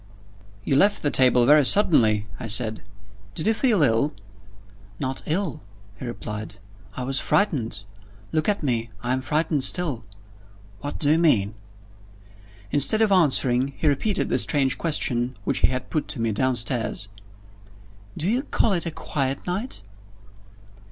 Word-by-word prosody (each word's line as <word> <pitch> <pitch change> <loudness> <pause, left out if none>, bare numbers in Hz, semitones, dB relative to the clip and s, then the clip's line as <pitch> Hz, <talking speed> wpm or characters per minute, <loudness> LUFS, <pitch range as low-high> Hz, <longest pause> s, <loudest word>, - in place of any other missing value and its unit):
"You 135 - 0
left 205 +7 +3
the 145 - +1
table 125 -2 +4
very 150 +3 +6
suddenly," 115 - +3
I 115 - -5
said. 110 0 +2 0.5
"Did 155 - -3
you 220 - +3
feel 220 - +2
ill?" 135 +4 +1 0.8
"Not 130 0 -3
ill," 165 -2 -2 0.4
he - - -6
replied. 105 -3 -6 0.4
"I 130 - -3
was 135 +1 0
frightened. 120 - 0 0.5
Look 155 +2 0
at 205 -5 -1
me 120 -4 -1
I'm 130 +2 -1
frightened 150 0 0
still." 145 -10 +2 0.8
"What 145 +1 -6
do 145 -1 +1
you 160 - +3
mean?" 110 -12 +2 1.2
Instead 215 +10 +4
of 215 - +1
answering, 135 -6 +3
he - - -4
repeated 190 +9 0
the - - +1
strange 135 -3 0
question 130 -6 -1
which - - -1
he - - +4
had 130 0 -5
put 155 - -2
to 130 - -4
me 115 -1 0
downstairs. 115 -2 -2 1.1
"Do 165 - -2
you 240 +5 +1
call 230 -6 0
it 170 -2 -2
a - - -3
quiet 135 -3 -3
night?" 185 - -4
135 Hz, 145 wpm, -23 LUFS, 120-165 Hz, 1.2 s, very